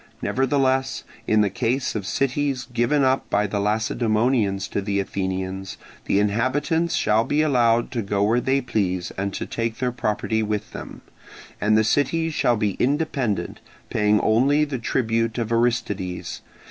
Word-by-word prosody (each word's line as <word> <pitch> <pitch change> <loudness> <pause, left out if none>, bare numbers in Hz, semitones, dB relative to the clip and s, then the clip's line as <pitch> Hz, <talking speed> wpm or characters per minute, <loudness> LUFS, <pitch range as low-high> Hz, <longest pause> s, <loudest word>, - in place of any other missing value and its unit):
Nevertheless, 135 0 0 0.2
in 110 0 +4
the 100 -2 +1
case 125 +4 -1
of 100 -4 -4
cities 135 0 0
given 120 +5 +2
up 130 0 +1
by 105 - +2
the 105 0 -2
Lacedaemonians 110 -1 +1
to 100 - -2
the 100 0 -1
Athenians, 95 0 -3 0.3
the 100 - +2
inhabitants 130 - +1
shall 110 +1 +2
be 150 +5 +1
allowed 120 -5 +2
to 120 - -1
go 100 0 0
where 115 +4 +2
they 135 +2 +1
please 95 -7 -1
and 100 +1 -3
to - - -3
take 115 -1 -3
their 125 -1 -1
property 110 -1 -1
with 105 -1 -3
them: - - -9 0.6
and 110 +2 +3
the 110 - +4
cities 160 +7 +1
shall 120 -5 +2
be 105 -2 +1
independent, 130 - -1 0.3
paying 105 0 +3
only 140 +7 +3
the 140 -4 -4
tribute 115 -1 0
of 115 -2 -2
Aristides. 115 -6 -1
115 Hz, 155 wpm, -23 LUFS, 105-130 Hz, 0.6 s, in